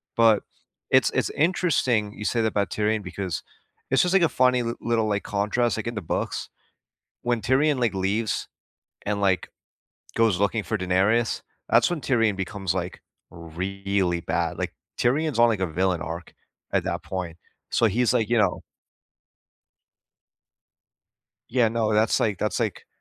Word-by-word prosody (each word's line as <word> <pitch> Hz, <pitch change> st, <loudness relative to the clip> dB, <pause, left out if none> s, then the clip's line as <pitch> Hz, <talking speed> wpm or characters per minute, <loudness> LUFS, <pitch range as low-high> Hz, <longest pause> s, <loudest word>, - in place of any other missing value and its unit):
But, 115 Hz, -3 st, +5 dB, 0.5 s
it's -, -, +4 dB
it's -, -, 0 dB
interesting 135 Hz, -, +1 dB
you 105 Hz, -, -7 dB
say 115 Hz, -, +1 dB
that 110 Hz, -, +2 dB
about 100 Hz, -2 st, -1 dB
Tyrion, 105 Hz, 0 st, 0 dB
because 90 Hz, -2 st, -4 dB, 0.5 s
it's 135 Hz, -, +5 dB
just, 180 Hz, +1 st, +1 dB
like, 190 Hz, -, +5 dB
a -, -, +6 dB
funny 125 Hz, -1 st, +3 dB
l 115 Hz, 0 st, -2 dB
little, 115 Hz, -2 st, +1 dB
like, 105 Hz, -1 st, 0 dB
contrast, 110 Hz, +3 st, 0 dB
like, 110 Hz, -, -4 dB
in 120 Hz, -, -3 dB
the 105 Hz, -, -3 dB
books, 80 Hz, -, -3 dB, 0.7 s
when 120 Hz, -2 st, -1 dB
Tyrion, 140 Hz, +2 st, +2 dB
like, 120 Hz, -3 st, +1 dB
leaves, 100 Hz, +3 st, -1 dB, 0.6 s
and, 100 Hz, 0 st, -1 dB
like, 95 Hz, -2 st, +1 dB, 0.7 s
goes 110 Hz, -6 st, +3 dB
looking 100 Hz, +2 st, +1 dB
for 110 Hz, +1 st, -2 dB
Daenerys, 95 Hz, +6 st, +1 dB, 0.3 s
that's -, -, +4 dB
when 175 Hz, -3 st, -2 dB
Tyrion 115 Hz, -7 st, +2 dB
becomes, 95 Hz, -1 st, -2 dB
like, 90 Hz, -1 st, -4 dB, 0.3 s
really 95 Hz, +2 st, -2 dB
bad. -, -, -2 dB
Like, -, -, -3 dB, 0.2 s
Tyrion's 140 Hz, 0 st, +1 dB
on, 120 Hz, -, +7 dB
like, 110 Hz, -4 st, +1 dB
a 95 Hz, -, +1 dB
villain 90 Hz, +1 st, 0 dB
arc 85 Hz, +2 st, -7 dB, 0.4 s
at -, -, +1 dB
that -, -, -2 dB
point, 90 Hz, -3 st, -5 dB, 0.3 s
so 115 Hz, -, +3 dB
he's, 115 Hz, +3 st, +2 dB
like, 110 Hz, -, +1 dB
you 120 Hz, -, +3 dB
know 100 Hz, -4 st, +1 dB, 2.9 s
Yeah, 120 Hz, -2 st, +3 dB
no, 110 Hz, -1 st, 0 dB
that's, 105 Hz, +1 st, +3 dB
like 105 Hz, -4 st, 0 dB
that's, 105 Hz, +3 st, -1 dB
like, 110 Hz, -5 st, -2 dB
105 Hz, 160 wpm, -25 LUFS, 95-120 Hz, 2.9 s, on